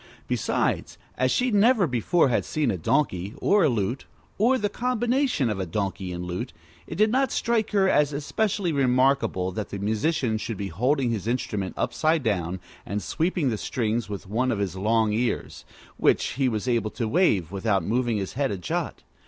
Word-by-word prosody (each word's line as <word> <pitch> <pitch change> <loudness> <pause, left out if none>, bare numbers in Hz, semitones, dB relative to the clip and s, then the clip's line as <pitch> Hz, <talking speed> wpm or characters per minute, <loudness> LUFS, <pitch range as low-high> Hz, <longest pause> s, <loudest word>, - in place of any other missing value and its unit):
Besides, - - -1 0.2
as - - +1
she 250 -1 +1
never 215 0 +4
before 135 +3 +2
had 120 - +1
seen 150 -6 0
a 95 - -2
donkey, 100 - 0
or 205 -1 +3
a - - +4
lute, 115 +2 -2 0.3
or 245 +5 +4
the 210 - 0
combination 245 - 0
of 95 -5 -2
donkey 95 -1 -3
and 90 0 -5
lute, 90 0 -4 0.3
it - - -6
did 215 +4 +3
not 265 +1 +2
strike 225 -2 0
her 195 -2 +3
as 150 -5 +3
especially 180 +6 -1
remarkable 130 -8 +2
that 105 +3 -5
the 100 - -5
musician 110 +3 0
should 110 -1 -4
be 100 0 -4
holding 125 - +1
his 110 -2 -3
instrument 105 -6 -2
upside 155 -1 +1
down, 95 -5 -1 0.2
and 100 +1 -4
sweeping 165 -4 0
the 110 - -3
strings 115 -2 -1
with 100 -1 -6
one 125 +6 0
of 110 - -1
his 100 -3 -2
long 110 +2 +1
ears, 120 +2 -2 0.3
which - - +2
he 130 +1 0
was 110 +1 -3
able 115 -3 +1
to 115 +1 -3
wave 110 - +2
without 100 -1 0
moving 115 +3 0
his 95 -2 -4
head 135 +1 0
a 100 - -3
jot. 90 - -3
120 Hz, 185 wpm, -25 LUFS, 100-160 Hz, 0.3 s, never